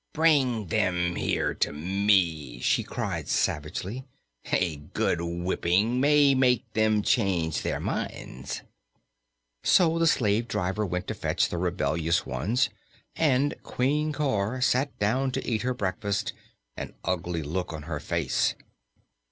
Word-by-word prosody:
"Bring 140 -9 +3
them 90 -4 +1
here - - 0
to - - 0
me!" 85 -6 +1
she - - +2
cried - - -4
savagely. 90 - -1 0.5
"A 85 -5 +1
good 75 +3 -1
whipping 90 +6 0
may 145 -1 +5
make 125 -2 +3
them 110 -1 +2
change 95 - +1
their - - -2
minds." 65 +2 -4 1.0
So 165 -2 +4
the 165 - +3
slave 115 -4 +2
driver 100 +1 -1
went 90 0 -3
to - - -1
fetch - - 0
the 85 - -3
rebellious 85 -2 0
ones 95 - 0 0.5
and 145 -2 +2
Queen 150 +4 0
Cor 130 -6 -1
sat 130 +2 +1
down 125 +6 +1
to - - -3
eat 110 -3 0
her 125 0 -1
breakfast, 100 -1 -2 0.4
an - - -6
ugly 85 -2 -1
look 90 +5 -3
on 80 -2 -6
her 75 -1 -4
face. - - 0
100 Hz, 130 wpm, -27 LUFS, 85-125 Hz, 1.0 s, may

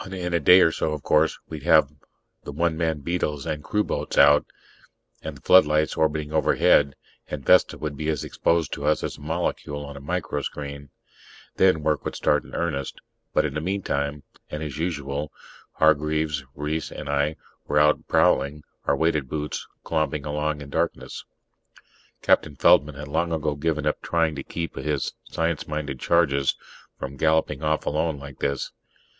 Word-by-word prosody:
In 90 -2 -4
a 85 - +3
day 90 +5 +7
or 80 - +5
so, 80 - -1
of 75 -3 -6
course, 80 +1 +3
we'd 80 -2 -7
have 80 -2 +4 0.5
the - - -7
one 85 +3 0
man 80 -2 -1
beetles 75 -3 -2
and 75 -1 -3
crewboats 105 +4 -2
out, 75 0 +6 0.7
and - - -6
the - - -19
floodlights 75 -4 +5
orbiting 75 -1 0
overhead, 70 -3 +3 0.3
and 70 -3 -5
Vesta - - +5
would 75 -2 -4
be 75 +2 -3
as 75 - -1
exposed 85 -2 0
to - - -5
us 75 +1 +2
as - - -4
a - - -15
molecule 75 -2 -3
on 70 0 -9
a 70 - -9
microscreen. 70 -3 -4 0.7
Then 95 -5 +4
work 75 -1 +1
would - - -4
start - - +2
in - - -11
earnest. 75 -6 -2 0.3
But - - +2
in - - -2
the 75 - -2
meantime 75 -6 -2 0.3
and 75 +1 -5
as 75 -1 -6
usual 75 -3 -3 0.4
Hargraves, 75 -1 +1
Reiss 75 +2 -3
and - - -7
I 70 +2 0 0.3
were 75 - 0
out 75 +1 +3
prowling, 70 +2 +2 0.2
our - - +2
weighted 75 -5 0
boots 75 -1 -4 0.2
clomping 75 -2 -1
along 75 0 -2
in 70 0 -9
darkness. 85 +3 -2 1.0
Captain 75 -2 +3
Feldman 70 +2 +4
had 75 +1 -7
long 85 +3 -1
ago 75 -2 0
given 75 +1 -1
up 75 - 0
trying 80 -2 +1
to 70 - -5
keep 85 -1 -5
his 75 -3 -2
science 80 -1 -2
minded 75 -3 -4
charges 70 -5 +2 0.4
from 70 0 -6
galloping 80 -2 +1
off 75 0 0
alone 80 0 0
like 70 -1 -10
this. 70 -1 -2
75 Hz, 170 wpm, -24 LUFS, 70-80 Hz, 1.0 s, day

